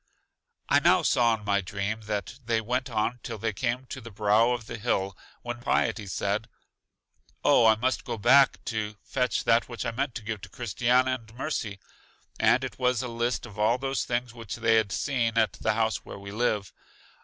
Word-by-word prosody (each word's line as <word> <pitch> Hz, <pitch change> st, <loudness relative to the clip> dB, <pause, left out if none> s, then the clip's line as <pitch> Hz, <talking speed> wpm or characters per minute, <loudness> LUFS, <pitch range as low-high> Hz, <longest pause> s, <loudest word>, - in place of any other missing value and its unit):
I -, -, +5 dB
now -, -, +4 dB
saw 115 Hz, -2 st, +3 dB
in 105 Hz, -, -14 dB
my 100 Hz, -1 st, +2 dB
dream 100 Hz, +4 st, -3 dB
that 105 Hz, +4 st, -4 dB
they 115 Hz, -1 st, +1 dB
went 125 Hz, +4 st, -2 dB
on 115 Hz, +2 st, -1 dB
till -, -, -6 dB
they 110 Hz, +1 st, -2 dB
came 125 Hz, +4 st, -2 dB
to 130 Hz, -, -6 dB
the 115 Hz, -, -9 dB
brow 105 Hz, +2 st, +3 dB
of 120 Hz, -3 st, -2 dB
the 115 Hz, 0 st, -7 dB
hill, 100 Hz, -4 st, -1 dB, 0.3 s
when 120 Hz, 0 st, -5 dB
Piety 105 Hz, -3 st, 0 dB
said: 100 Hz, +4 st, -2 dB, 1.0 s
O, 115 Hz, -, +6 dB
I 110 Hz, -, +6 dB
must 125 Hz, +4 st, -1 dB
go -, -, -4 dB
back 130 Hz, +5 st, +5 dB
to 110 Hz, -2 st, -3 dB
fetch 125 Hz, -3 st, -1 dB
that 115 Hz, +2 st, +3 dB
which 120 Hz, +1 st, -5 dB
I 115 Hz, -, -1 dB
meant 130 Hz, +1 st, -2 dB
to 115 Hz, -, -5 dB
give 105 Hz, -1 st, -4 dB
to -, -, -10 dB
Christiana 125 Hz, +3 st, +1 dB
and 110 Hz, -1 st, -18 dB
Mercy, 120 Hz, -7 st, -3 dB, 0.6 s
and -, -, +4 dB
it -, -, -6 dB
was 125 Hz, -1 st, +1 dB
a -, -, -3 dB
list 120 Hz, +1 st, -1 dB
of 105 Hz, -3 st, -11 dB
all 110 Hz, +3 st, +3 dB
those 135 Hz, +1 st, -1 dB
things 120 Hz, -1 st, -2 dB
which 115 Hz, -4 st, -7 dB
they 115 Hz, -1 st, +2 dB
had 110 Hz, -3 st, +3 dB
seen 115 Hz, -4 st, 0 dB
at 110 Hz, -4 st, +3 dB
the -, -, 0 dB
house 110 Hz, 0 st, +1 dB
where -, -, -10 dB
we 100 Hz, 0 st, -9 dB
live. 105 Hz, -3 st, -1 dB
115 Hz, 200 wpm, -27 LUFS, 105-125 Hz, 1.0 s, O